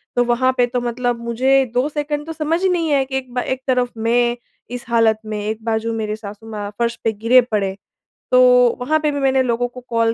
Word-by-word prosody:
तो 245 - +3
वहाँ 245 +2 +2
पे 245 - +4
तो 245 +1 -2
मतलब 240 0 -2
मुझे 260 +3 +2
2 250 +3 +1
सेकंड 295 0 -3
तो 325 - -6
समझ 320 +2 -1
ही 380 - +2
नहीं 335 -3 0
आया 275 -1 +3
कि 265 0 -3
एक 255 -2 -7
बा 250 - 0
एक 260 +1 -3
तरफ़ 250 -1 +1
मैं 240 +2 +1 0.3
इस 245 0 -6
हालत 225 -2 +3
में, 215 -1 -4
एक 220 +1 -4
बाजू 225 0 -1
मेरे 215 -1 -3
सासु 210 0 -10
माँ 205 -1 -5
फर्श 235 0 0
पे 225 - +2
गिरे 230 +4 +4
पड़े। 205 -5 -2 0.6
तो 255 0 +6 0.4
वहाँ 305 +5 +1
पे 300 - +2
भी 285 - -3
मैंने 265 -1 +2
लोगों 245 0 0
को 250 +1 -12
कॉल 230 -1 +1
245 Hz, 230 wpm, -19 LUFS, 230-265 Hz, 0.6 s, तो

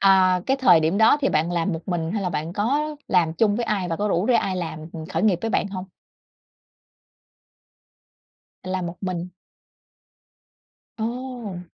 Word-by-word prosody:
à, 185 -2 +5
cái 270 - +2
thời 260 -11 +6
điểm 160 +5 +1
đó 220 +5 +6
thì 275 - +2
bạn 155 +3 +1
làm 175 +2 0
một 165 +3 -6
mình 170 -2 -1
hay 210 -2 -1
là 185 - 0
bạn 160 +1 -3
có 230 +10 +1 0.3
làm 175 -4 +3
chung 205 +4 +2
với 240 - -1
ai 200 -5 -1
và 165 - -1
có 210 +3 -1
rủ 180 -1 +1
rê 250 - +4
ai 195 -4 +1
làm, 170 -3 -4
ừm, 160 -1 -7
khởi 165 +1 -2
nghiệp 205 -5 +3
với 225 - -1
bạn 215 - +1
hông? 190 -1 -6 2.8
Làm 185 -1 -3
một 170 +1 -6
mình. 180 -2 -3 1.7
Ồ! 235 -5 -4
185 Hz, 175 wpm, -23 LUFS, 170-215 Hz, 2.8 s, thời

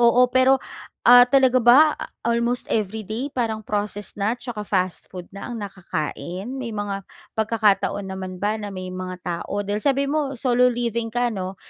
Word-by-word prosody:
oo, 240 +1 +5
pero, 260 +1 +4 0.5
ah, 245 0 +10
talaga 260 0 +3
ba, 290 +6 +6
a - - -8 0.2
almost 235 +1 0
every 215 0 -1
day 245 +7 -4
parang 220 -4 -2
processed 205 0 -2
na, 215 +5 +1
'tsaka 240 -3 -6
fast 185 -2 -1
food 180 -1 -8
na 200 - -8
ang 235 - -5
nakakain, 185 - -5
may 250 -3 -4
mga 205 -1 -3 0.3
pagkakataon 215 -2 +1
naman 190 -1 -6
ba 210 +2 0
na 205 - -5
may 185 0 -6
mga 185 0 -5
tao 180 +3 -3
dahil, 205 +2 -2
sabi 275 +1 +2
mo, 285 -3 -1
solo 250 0 +3
living 235 -1 -2
ka, 245 0 0
'no, 190 -2 -5
220 Hz, 175 wpm, -23 LUFS, 195-245 Hz, 0.5 s, ah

